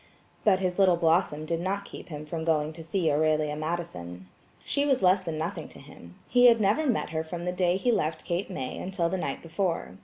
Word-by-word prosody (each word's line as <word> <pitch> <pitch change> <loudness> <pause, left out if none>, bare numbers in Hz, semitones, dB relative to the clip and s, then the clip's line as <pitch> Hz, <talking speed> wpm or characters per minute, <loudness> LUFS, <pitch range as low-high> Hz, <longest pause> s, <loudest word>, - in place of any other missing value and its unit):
But 200 -3 +5
his 185 0 -2
little 185 -2 +6
Blossom 165 -2 +1
did 165 +1 -1
not 195 +3 -2
keep - - -10
him 150 -1 -6
from 160 +1 -4
going 155 -1 +1
to 165 +1 -9
see 165 -1 0
Aurelia 155 0 +1
Madison. 95 - -5 0.4
She 285 - 0
was 270 -7 +1
less 185 +1 +5
than 165 -4 -4
nothing 165 0 -4
to - - -14
him. 85 -11 -14
He 245 0 +6
had 230 -1 +6
never 215 +9 +2
met 230 - 0
her 160 0 -1
from 170 +2 -6
the 180 - 0
day 180 0 +1
he 240 +6 +1
left 160 -7 -1
Cape 175 +3 -2
May 135 -9 -5
until 180 -2 -1
the 190 - -1
night - - -4
before. 165 - -2
170 Hz, 220 wpm, -27 LUFS, 155-190 Hz, 0.4 s, little